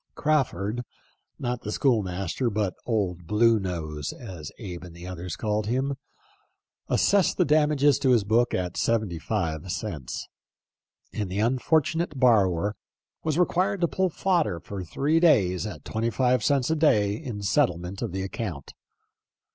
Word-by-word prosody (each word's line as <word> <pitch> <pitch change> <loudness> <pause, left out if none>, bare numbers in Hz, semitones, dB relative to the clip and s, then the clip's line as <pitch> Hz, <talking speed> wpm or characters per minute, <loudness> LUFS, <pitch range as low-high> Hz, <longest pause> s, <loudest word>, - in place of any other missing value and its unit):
Crawford 125 -7 0 0.3
— - - -43
not 125 -1 -2
the 105 - -5
school 120 -2 +2
master, 95 +6 -2
but 105 -3 -1
old 90 -7 -1
Blue 115 +3 +4
Nose, 80 -6 -4
as 90 - -8
Abe 90 -6 -7
and 85 -1 -12
others 90 0 -5
called 105 -1 -1
him 130 +4 0 0.5
— - - -50
assessed 200 -4 +3
the - - +3
damage 150 -1 +2 0.2
to 130 - +2
his 120 -4 +4
book 115 +4 +2
at 90 -1 -3
seventy 110 -7 0
five 85 -2 -2
cents, 80 - -5 0.9
and 105 -3 -3
the 95 - -4
unfortunate 150 +7 +1
borrower 105 -5 +3 0.5
was 155 -1 0
re 180 - +5
quired 185 +2 0
to 170 - +4
pull 190 +2 0
fodder 165 - 0
for 100 0 -6
three 145 - +1
days 105 - +3
at 105 - -9
twenty 115 +1 -1
five 125 +1 +2
cents 140 0 +2
a - - +3
day 105 -11 +3
in 110 -4 -6
settlement 90 -1 0
of 115 -5 -2
the 95 +1 -3
account. 95 - -5
110 Hz, 155 wpm, -26 LUFS, 90-135 Hz, 0.9 s, re